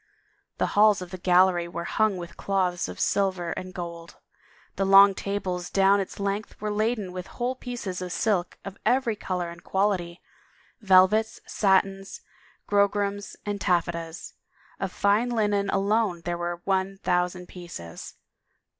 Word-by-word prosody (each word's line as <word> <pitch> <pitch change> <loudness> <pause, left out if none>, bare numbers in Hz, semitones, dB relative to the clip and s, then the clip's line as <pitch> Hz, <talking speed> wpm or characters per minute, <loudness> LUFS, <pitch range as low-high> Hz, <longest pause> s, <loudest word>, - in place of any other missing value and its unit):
The - - +1
halls 210 -2 +5
of 175 - -11
the 185 - -7
gallery 180 -1 +3
were 170 0 -5
hung 215 +2 +1
with 175 -1 -8
cloths 185 -3 -1
of 90 - -8
silver 185 -4 0
and 185 0 -5
gold; 170 -1 -7 0.6
the 195 - 0
long 195 +1 +7
tables 185 -3 -3
down 195 +1 +4
its 195 - -5
length 200 +1 -3
were 210 0 -3
laden 215 -2 -1
with 180 0 -6
whole 245 +1 -2
pieces 240 -8 -6
of 180 -1 -5
silk 185 -3 0
of 195 0 -8
every 245 -3 +2
color 180 -4 -3
and 170 0 -13
quality, 190 -3 -1 0.6
velvets, 200 +2 +4
satins, 195 -1 +1 0.5
grograms, 205 0 0
and 205 -1 -3
taffetas; 170 -2 -1 0.5
of - - -3
fine 210 +4 +2
linen 205 -4 +1
alone 200 -3 +1
there 175 +1 -3
were 175 0 -4
one 195 0 0
thousjmd 180 0 0
pieces. 170 - -9
195 Hz, 145 wpm, -26 LUFS, 180-205 Hz, 0.6 s, long